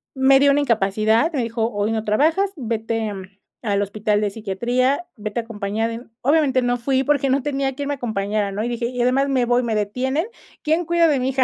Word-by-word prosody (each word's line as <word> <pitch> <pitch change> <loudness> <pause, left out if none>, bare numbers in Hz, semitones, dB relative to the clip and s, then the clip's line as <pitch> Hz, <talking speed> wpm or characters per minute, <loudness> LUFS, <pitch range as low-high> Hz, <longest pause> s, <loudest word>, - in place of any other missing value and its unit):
me 265 0 +5
dió 280 0 +5
una 285 +1 +3
incapacidad, 220 - +2
me 265 -5 0
dijo: 230 0 -1
"Hoy 205 0 -1
no 220 -1 -1
trabajas, 320 - +2
vete, 225 -4 -2
mm, 195 - -7 0.4
al 205 -3 0
hospital 210 +1 0
de 210 - +1
psiquiatría, 240 - -1
vete 215 +1 -4
a - - -3
acompañada 220 0 -3
de" 230 +2 -7 0.2
obviamente, 280 -2 +3
no 245 0 0
fui 265 +2 0
porque, 280 -1 +1
no 270 +2 +2
tenía 275 -2 -1
quien 285 +1 -4
me 285 - 0
acompañara, 210 -4 -2
¿no? 205 +2 -3
Y 240 - -2
dije: 235 0 -2
"Y 245 0 -3
además 260 +3 +2
me 260 -3 +2
voy, 245 +1 +2
me 230 -2 -1
detienen, 255 - -1 0.4
¿quién 325 +2 +1
cuida 340 0 +3
de 290 -4 +2
mi 255 +1 0
hija?" 265 0 +2
245 Hz, 220 wpm, -21 LUFS, 215-275 Hz, 0.4 s, me